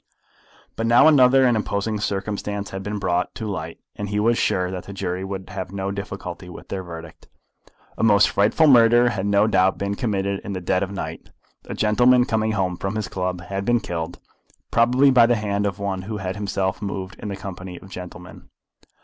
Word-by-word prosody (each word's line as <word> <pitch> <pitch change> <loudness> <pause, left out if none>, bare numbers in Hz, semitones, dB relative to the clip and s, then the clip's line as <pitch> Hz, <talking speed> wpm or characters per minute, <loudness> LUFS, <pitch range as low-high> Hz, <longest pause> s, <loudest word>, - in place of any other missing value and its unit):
But 115 - -1
now 120 +6 +6
other 135 -3 +6
and 120 -2 +3
imposing 105 0 -2
circumstances 100 0 -3
had 95 - -5
been 105 +2 -4
brought 90 -2 -1
to 110 - -5
light, 85 -5 -5 0.2
and 105 -1 -5
he 105 0 -1
was 115 +3 +3
sure 90 -4 0
that 90 -1 -6
the 100 - -8
jury 95 -1 -3
would 95 -1 -6
have 95 -1 -5
no 100 0 -3
difficulty 100 -2 -6
with 90 - -11
their 95 - -3
verdict. 85 -2 -10 0.7
A - - 0
most 105 -3 +5
frightful 105 +10 +3
murder 120 -3 +6
had 100 -4 -2
no 100 +1 +4
doubt 95 -3 +2
been 100 0 -2
committed 100 -3 -1
in 100 - -6
the 95 - -3
dead 90 +1 0
of 95 - -1
the 100 - -7
night. - - -6 0.4
A - - -6
gentleman 125 +3 +4
coming 110 -1 0
home 90 -4 -1
from 95 +3 -3
his 110 -1 -2
club 90 -1 -3
had 95 +2 -4
been 120 +3 +2
killed, 85 -4 -5 0.5
probably 125 +4 +4
by 120 -3 +6
the 120 - +3
hand 100 -1 -1
of 95 -2 -4
one 100 -2 -3
who 105 +3 -5
had 95 -1 -4
himself 100 -2 -2
moved 95 -2 -5
in - - -6
the 100 - -3
company 95 -2 -8
of 95 - -15
gentlemen. 90 -1 -10
100 Hz, 205 wpm, -22 LUFS, 95-110 Hz, 0.7 s, now